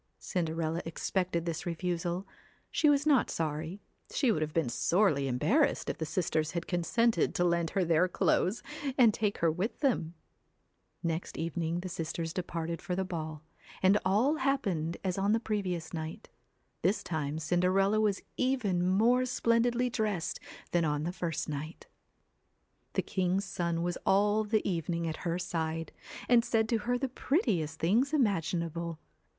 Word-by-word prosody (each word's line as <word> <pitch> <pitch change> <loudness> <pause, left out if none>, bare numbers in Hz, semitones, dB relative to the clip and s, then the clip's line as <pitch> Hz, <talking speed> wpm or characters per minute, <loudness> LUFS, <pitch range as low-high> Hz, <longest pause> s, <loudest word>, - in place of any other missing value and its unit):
Cinderella 165 -2 -2
expected 170 +1 -1
this 170 0 -3
refusal. 175 +1 -2 0.5
She 305 - +3
was 290 0 +3
not 285 -5 +4
sorry; 160 +4 -3 0.3
she 260 -5 +2
would 175 - 0
have 155 0 -1
been 160 -3 +1
sorely 150 - +2
embarrassed 215 - +2
if - - -11
the 160 - -2
sisters 160 -2 0
had 170 -1 -2
consented 225 +7 +1
to 175 - +2
lend 170 -1 +2
her 185 - +3
their 165 +2 +3
clothes, 185 +3 +1 0.3
and 235 -5 +6
take 205 -1 0
her 165 -1 +2
with 185 +8 -3
them. 200 - +1 0.9
Next 165 0 -2
evening 165 +1 -2
the 185 - -5
sisters 165 -1 -4
departed 170 -2 -3
for 180 - -3
the 190 +1 -1
ball, 155 -4 -5 0.4
and 195 +3 +5
all 225 +11 +3
happened 195 - 0
as 185 0 -1
on 200 +2 +2
the 225 - +3
previous 185 -8 -3
night. 160 -1 -6 0.5
This 190 +6 +1
time 155 -2 -2
Cinderella 185 +6 +2
was 205 -2 +1
even 245 -9 +1
more 235 +7 +4
splendidly 240 0 +2
dressed 210 -7 -1 0.3
than 175 -1 +2
on 150 -1 0
the 175 +3 -2
first 170 -4 -3
night. 155 +3 -6 1.1
The - - +1
king's 190 +1 0
son 170 -3 -1
was 175 0 -2
all 205 +2 +3
the 215 +1 +1
evening 170 -2 -1
at 160 - -3
her 170 +1 0
side, 165 -2 -3 0.4
and 240 -1 +5
said 225 -2 +1
to 230 - +2
her 245 - +3
the 270 - -1
prettiest 215 - 0
things 230 - +2
imaginable. 170 - 0
175 Hz, 155 wpm, -31 LUFS, 165-215 Hz, 1.1 s, and